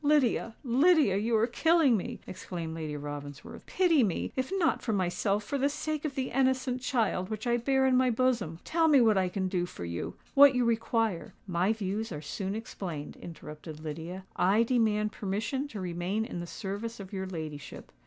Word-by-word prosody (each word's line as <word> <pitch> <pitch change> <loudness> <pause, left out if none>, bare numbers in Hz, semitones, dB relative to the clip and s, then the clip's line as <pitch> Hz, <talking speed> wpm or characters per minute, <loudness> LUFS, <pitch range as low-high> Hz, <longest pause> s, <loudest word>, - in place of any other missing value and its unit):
"Lydia—Lydia, 280 - +3
you 225 +3 +1
are 220 - +4
killing 310 +2 +4
me!" 195 - -4
exclaimed 170 -3 -6
Lady 155 -2 -4
Ravensworth. 145 0 -8
"Pity 345 -6 +3
me—if 255 - -2
not 335 -4 +2
for 225 - -1
myself, 195 +2 0
for 280 +4 -2
the 280 +2 +3
sake 305 +1 -3
of 280 -3 -3
the 260 -1 -2
innocent 260 -1 +1
child 220 -7 0
which 215 +1 -4
I 240 0 +2
bear 265 +2 +2
in 260 -1 +4
my 255 0 +4
bosom. 230 -9 +1
Tell 330 0 +2
me 290 -3 +6
what 225 -3 +5
I 185 -1 +2
can 190 0 -1
do 180 -2 -1
for 90 - -7
you—what 265 - +3
you 250 -1 +2
require——" 225 -6 0
"My 180 +1 +1
views 215 0 -2
are 150 - -4
soon 190 +6 -4
explained," 175 -9 -6
interrupted 155 -1 -9
Lydia. 165 +5 -6
"I 200 +5 +4
demand 220 -3 +2
permission 220 +9 -2
to 220 -8 -7
remain 180 +4 -2
in 225 -7 -5
the 175 - -5
service 215 +5 -5
of 195 0 -9
your 190 -1 -3
ladyship." 155 -5 -7
215 Hz, 180 wpm, -30 LUFS, 180-255 Hz, -, me